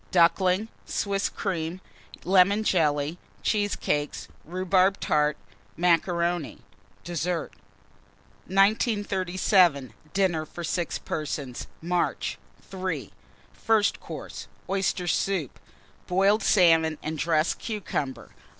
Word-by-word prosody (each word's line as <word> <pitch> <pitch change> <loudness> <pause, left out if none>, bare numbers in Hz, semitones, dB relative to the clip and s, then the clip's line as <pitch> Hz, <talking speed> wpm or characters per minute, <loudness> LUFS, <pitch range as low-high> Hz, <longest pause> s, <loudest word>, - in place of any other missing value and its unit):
Ducklings. 185 +3 +3 0.2
Swiss 200 -1 -1
Cream. 175 -2 -3 0.4
Lemon 195 +3 +4
Jelly. 155 -3 +1 0.2
Cheesecakes. 205 -8 -1 0.2
Rhubarb 185 +2 +2
Tart. 150 0 +1 0.4
Macaroni. 170 -1 +1 0.5
Dessert. 175 0 -2 1.0
1937. 190 - +2 0.2
DINNER 175 -6 +1
FOR 175 - -8
6 170 0 -1
PERSONS 145 -5 -4 0.2
(March). 175 +1 -1 0.3
III. 185 - -4 0.4
FIRST 220 -2 +2
COURSE. - - -8 0.2
Oyster 190 -1 0
Soup. 175 -4 -1 0.5
Boiled 195 +4 +3
Salmon 165 -5 +4
and 155 0 -4
dressed 160 0 +1
Cucumber. 175 - -4
180 Hz, 85 wpm, -26 LUFS, 160-195 Hz, 1.0 s, Lemon